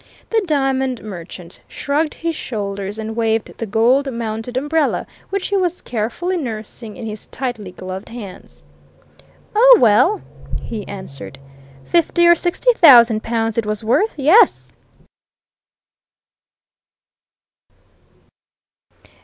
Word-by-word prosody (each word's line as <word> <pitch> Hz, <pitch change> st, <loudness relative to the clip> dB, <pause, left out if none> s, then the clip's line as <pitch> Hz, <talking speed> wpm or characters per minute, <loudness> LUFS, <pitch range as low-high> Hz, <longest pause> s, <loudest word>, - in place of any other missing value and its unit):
The 450 Hz, -1 st, +2 dB
diamond 265 Hz, -4 st, 0 dB
merchant 175 Hz, -3 st, -9 dB
shrugged 300 Hz, +2 st, -2 dB
his 330 Hz, -1 st, -3 dB
shoulders 200 Hz, -5 st, -5 dB
and 220 Hz, 0 st, -5 dB
waved 225 Hz, -1 st, -1 dB
the 225 Hz, -, -3 dB
gold 245 Hz, +6 st, +2 dB
mounted 230 Hz, +1 st, -4 dB
umbrella 295 Hz, +3 st, 0 dB, 0.2 s
which 395 Hz, -1 st, -3 dB
he 400 Hz, -, 0 dB
was 360 Hz, -2 st, -1 dB
carefully 250 Hz, +12 st, -2 dB
nursing 225 Hz, -5 st, -7 dB
in 230 Hz, -, -7 dB
his 215 Hz, -1 st, -7 dB
tightly 235 Hz, -8 st, -5 dB
gloved 185 Hz, +1 st, -8 dB
hands. 220 Hz, -5 st, -10 dB, 0.9 s
"Oh, -, -, +7 dB
well!" 235 Hz, -, +4 dB, 0.4 s
he 215 Hz, -4 st, -7 dB
answered. 140 Hz, -9 st, -9 dB, 0.5 s
"Fifty 345 Hz, 0 st, +2 dB
or 345 Hz, -, +8 dB
sixty 355 Hz, +9 st, +1 dB
thousand 240 Hz, -, +7 dB
pounds 225 Hz, -1 st, -1 dB
it 225 Hz, -, -2 dB
was 215 Hz, 0 st, -3 dB
worth 320 Hz, -, +1 dB
yes!" 315 Hz, -, +4 dB
235 Hz, 110 wpm, -19 LUFS, 215-315 Hz, 0.9 s, or